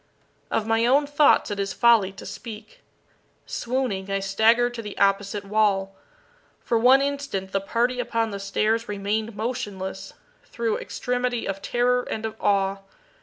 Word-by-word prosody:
Of 220 - 0
my 225 +1 +2
own 280 +4 +4
thoughts 290 -5 +3
it 205 - -3
is 195 -1 -2
folly 225 -4 +4
to - - -11
speak. 215 +1 -9 0.7
Swooning, 235 -6 -2
I 195 0 0
staggered 225 +5 +3
to 235 - -5
the 210 -2 -8
opposite 200 +1 +1
wall. 195 -2 +1 0.6
For 230 - 0
one 260 +4 +6
instant 280 -10 -3
the 195 - 0
party 240 +5 0
upon 230 -2 -1
the 200 - -5
stairs 215 +3 0
remained 205 +2 -2
motionless, 210 -4 -4 0.3
through 230 -2 -2
extremity 245 -1 -2
of 195 0 -4
terror 245 +3 +1
and 220 -2 -5
of 220 0 -4
awe. 195 -1 +2
220 Hz, 150 wpm, -24 LUFS, 195-240 Hz, 0.7 s, one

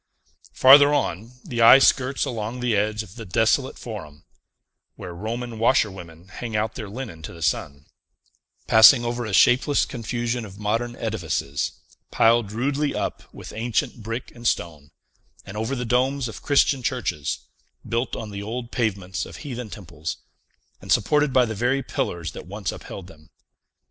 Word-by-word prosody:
Farther 140 +2 +8
on, 110 -1 -2
the 120 -2 -2
eye 115 +3 +10
skirts 135 0 +3
along 115 -2 -4
the 125 -3 +1
edge 105 +1 0
of 105 +1 -15
the 115 - -6
desolate 110 +8 +1
Forum 85 -10 -9 0.7
(where 90 - -8
Roman 115 +5 -5
washerwomen 95 - 0
hang 115 +3 -6
out 110 +1 0
their 105 - -7
linen 105 -7 -7
to 75 - -8
the 85 -1 -8
sun), 70 -1 -2 0.8
passing 120 +3 +7
over 120 0 -2
a - - -4
shapeless 130 +8 +4
confusion 120 0 -3
of 100 -2 -10
modern 115 +3 -2
edifices, 85 -11 -2 0.4
piled 115 -2 +3
rudely 140 +6 -1
up - - -4
with - - -10
ancient 115 +1 -2
brick 115 +3 -5
and 120 0 -4
stone, 75 -7 -2 0.6
and 95 - -9
over 110 +5 -2
the 125 -1 -3
domes 130 +2 +1
of 115 - -9
Christian 140 -1 +3
churches, 75 - -2 0.5
built 115 +2 -1
on 110 -2 -6
the 100 0 -6
old 115 +3 -5
pavements 100 -6 -2
of - - -11
heathen 125 -4 -5
temples, 85 -7 -7 0.6
and - - -7
supported 150 -1 +3
by 125 -1 +4
the 110 - -4
very 125 +5 0
pillars 85 -8 -3
that - - -10
once 100 0 -4
upheld 95 - -9
them. 80 -4 -17
115 Hz, 160 wpm, -23 LUFS, 100-125 Hz, 0.8 s, eye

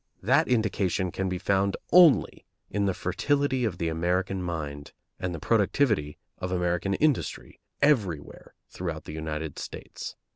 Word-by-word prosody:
That 140 +10 +4
indication 100 -6 +1
can 95 +1 -2
be 90 - -2
found 95 +1 +1
only 175 -5 +6 0.3
in 100 0 0
the 95 - +1
fertility 140 -3 0
of 95 -6 -2
the 85 - -1
American 90 +3 0
mind 75 -5 -5 0.3
and 90 -1 -2
the 85 - -4
productivity 105 - +1 0.2
of 90 - -3
American 90 +2 0
industry 150 +1 -1 0.2
everywhere 100 - 0
throughout 85 -4 -5
the - - -8
United 80 -1 -4
States. - - -7
95 Hz, 140 wpm, -27 LUFS, 85-110 Hz, 0.3 s, only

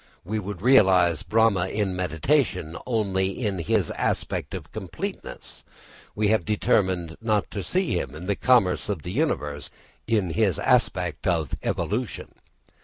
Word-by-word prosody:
We 110 +4 -2
would 100 -2 -6
realise 95 - +5
Brahma 110 -5 +2
in 100 -2 -1
mediation 90 - 0
only 100 -5 +1 0.2
in 100 -3 -1
his 85 - +1
aspect - - -2
of - - -8
completeness, - - -6 0.5
we 105 -1 +1
have 110 0 +2
determined 95 -5 +1
not 110 -3 0
to 100 - -3
see 185 - -1
him 70 -1 -5
in 80 +4 -8
the 100 +1 0
commerce 110 -7 +3
of 95 -7 -2
the 90 - -5
universe 75 - -1 0.4
in 105 -6 +1
his 100 -3 +2
aspect - - +1
of 80 -6 0
evolution. 115 +4 -3
100 Hz, 140 wpm, -25 LUFS, 90-110 Hz, 0.5 s, realise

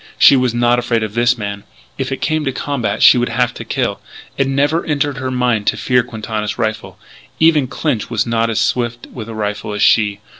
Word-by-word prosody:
She - - +7
was 125 -2 +2
not 120 +1 +2
afraid 120 -2 0
of 105 -2 -4
this 120 +1 +2
man. 100 -2 -5 0.3
If 135 0 -4
it 135 - -4
came 155 -1 0
to 135 - 0
combat 130 -6 -2
she 125 - +7
would 120 - 0
have 120 +1 0
to - - -7
kill. - - -2 0.4
It 135 - 0
never 145 +5 +1
entered 145 -2 -1
her 130 -1 -3
mind 125 -4 0
to - - +2
fear 125 -1 +2
Quintana's 110 -3 -5
rifle. 110 -1 -3 0.4
Even 155 -4 +4
Clinch 130 -3 -2
was 115 -2 0
not 115 -1 0
as 110 - 0
swift 120 -1 -1
with 115 -3 -7
a 115 - -7
rifle 105 0 -3
as 105 - 0
she.... 105 -3 +3
120 Hz, 215 wpm, -17 LUFS, 110-135 Hz, 0.4 s, She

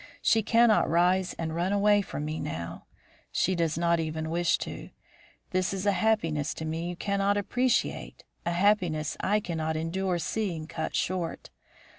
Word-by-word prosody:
She 225 - +4
cannot 230 +1 +4
rise 180 +2 +2
and 160 -1 -4
run 175 +3 0
away 205 0 +4
from 150 -6 -5
me 155 +1 -3
now. 85 +1 -5 0.5
She 190 - +1
does 165 -3 0
not 170 0 +2
even 160 0 -3
wish 175 +1 +2
to. - - -7 0.6
This 185 0 0
is 190 +1 -4
a 205 - +4
happiness 175 -7 +1
to 160 - -5
me 165 +2 -3
you 175 - -4
cannot 200 +2 0
appreciate, 250 +5 0 0.2
a 170 - -1
happiness 175 -5 +2
I 210 +2 +2
cannot 160 -4 -2
endure 180 +3 -1
seeing 170 -2 -2
cut 160 - -4
short. 175 - -2
175 Hz, 160 wpm, -28 LUFS, 160-200 Hz, 0.6 s, She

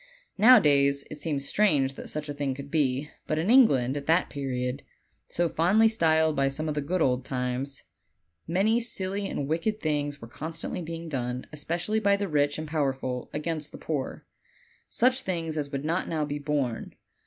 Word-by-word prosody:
Nowadays, 140 - +6
it 150 - -7
seems 145 -3 -2
strange 145 -11 +2
that - - -9
such 150 0 -4
a 145 - -4
thing 140 -2 -2
could 140 +1 -9
be; 145 -1 0 0.2
but 155 - 0
in 170 +8 +1
England, 140 - +5
at 145 -1 -5
that 165 +3 +3
period, 130 -1 -3 0.5
so 175 0 +1
fondly 190 +8 +4
styled 160 -7 +2
by 135 -1 +2
some 150 +3 -4
"the 150 -1 -1
good 170 +4 0
old 125 -1 +1
times," 125 +1 -3 0.6
many 200 +7 +2
silly 200 -3 -2
and 140 - -3
wicked 170 +8 -1
things 145 -3 -1
were 115 - -9
constantly 160 +9 -5
being 165 0 -6
done, 125 -4 -3
especially 170 +8 -1
by 200 -2 +3
the 200 0 -2
rich 145 -3 +1
and 155 0 -5
power 150 -3 +1
ful, 125 -2 -5
against 150 0 -3
the - - -9
poor 145 -5 -4 0.6
such 255 +2 +2
things 165 -6 -3
as 145 -2 -2
would 140 0 -3
not 170 +4 -1
now 155 -2 0
be 145 0 -4
borne. 145 -5 -2
150 Hz, 180 wpm, -27 LUFS, 140-170 Hz, 0.6 s, Nowadays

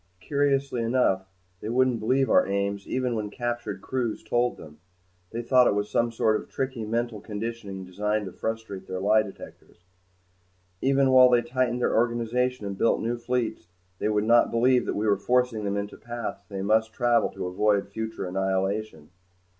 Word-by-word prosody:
Curiously 140 -1 0
enough, 115 -5 +1 0.3
they 105 - -5
wouldn't 125 0 +2
believe 130 +5 +2
our - - +4
aims 100 0 -2
even 130 -1 -1
when 105 -2 -3
captured 120 +2 -4
crews 125 -4 -2
told 120 +2 0
them. 75 -1 -13 0.5
They 115 +1 -5
thought 125 +1 +5
it - - +2
was 105 0 -2
some 120 0 +1
sort 110 -1 +1
of - - -16
tricky 130 -4 -3
mental 115 -1 -2
conditioning 105 -3 -5
designed 105 +3 -1
to 95 - -6
frustrate 110 -3 -5
their 95 0 -4
lie 105 +3 +4
detectors. 95 -3 -12 1.0
Even 135 0 +3
while 130 -1 +8
they 120 -1 +4
tightened 125 0 -1
their - - +1
organization 120 +1 0
and 100 -1 -5
built - - +3
new 120 +1 -2
fleets, 120 -5 -2 0.3
they - - 0
would 105 -1 +1
not 120 +2 +5
believe 125 +2 +3
that - - -1
we 105 - -1
were 100 -2 +3
forcing 125 0 +1
them 100 0 -1
into 100 0 -5
the - - -28
paths 120 0 -5
they 95 -1 -4
must 110 +2 +2
travel 120 -2 +2
to - - -6
avoid 100 +2 +1
future 110 -2 -5
annihilation. 95 -2 -2
110 Hz, 180 wpm, -26 LUFS, 100-120 Hz, 1.0 s, while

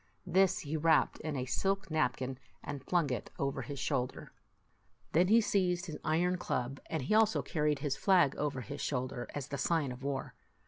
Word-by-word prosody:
This 185 +1 +3
he 150 +1 -4
wrapped 160 0 +3
in 155 -1 -4
a 130 -1 -2
silk 195 +6 -1
napkin, 130 -3 0 0.2
and 140 -2 -5
flung 165 -3 +1
it 125 - -3
over 140 0 -1
his 140 +3 -6
shoulder. 130 -2 -2 0.8
Then 175 +3 +4
he 225 +4 +6
seized 180 -4 +1
his 160 - -6
iron 175 +3 +1
club, 130 -2 -2
and 160 -4 -2
he 140 - 0
also 220 0 +4
car 150 -3 -1
ried 150 -1 +3
his 140 -1 -1
flag 180 -8 +4
over 145 -3 -2
his 140 +3 -6
shoulder, 125 -2 -2
as 145 -3 -4
the 140 - -4
sign 160 -6 +1
of 125 +1 -8
war. 135 -1 -3
150 Hz, 190 wpm, -33 LUFS, 135-175 Hz, 0.8 s, he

